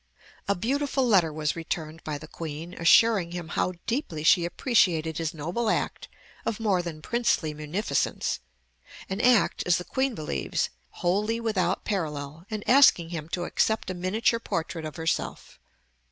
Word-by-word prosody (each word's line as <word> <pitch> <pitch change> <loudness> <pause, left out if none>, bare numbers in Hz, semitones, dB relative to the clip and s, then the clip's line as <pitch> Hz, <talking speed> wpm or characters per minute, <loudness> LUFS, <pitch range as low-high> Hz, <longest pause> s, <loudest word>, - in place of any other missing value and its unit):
A 200 - +2
beautiful 270 +5 0
letter 185 -8 +4
was 150 -1 -1
returned 165 -1 -5
by 150 -2 -3
the 155 - -11
Queen, 160 +2 -7
assuring 185 +1 +4
him 175 -2 -5
how 185 - 0
deeply 225 - -2
she 170 +1 +5
appreciated 170 - +1
his 165 -1 -1
noble 175 +8 -2
act - - -1 0.4
of 215 - -2
more 200 -5 +2
than 160 -3 -7
princely 230 -10 +1
munificence, 155 +8 -1 0.7
an 195 +3 -2
act, 245 -3 +4
as 175 - +4
the 180 - -4
Queen 265 +5 -1
believes, 110 - -2 0.3
"wholly 210 +6 +1
without 190 -6 0
parallel," 155 -4 -3
and 215 -2 -5
asking 245 -11 +6
him 160 -2 -5
to 175 0 -2
accept 220 +2 0
a - - -3
miniature 205 +6 +1
portrait 165 -6 -3
of 155 - -6
herself. 165 0 -3
175 Hz, 155 wpm, -27 LUFS, 160-220 Hz, 0.7 s, asking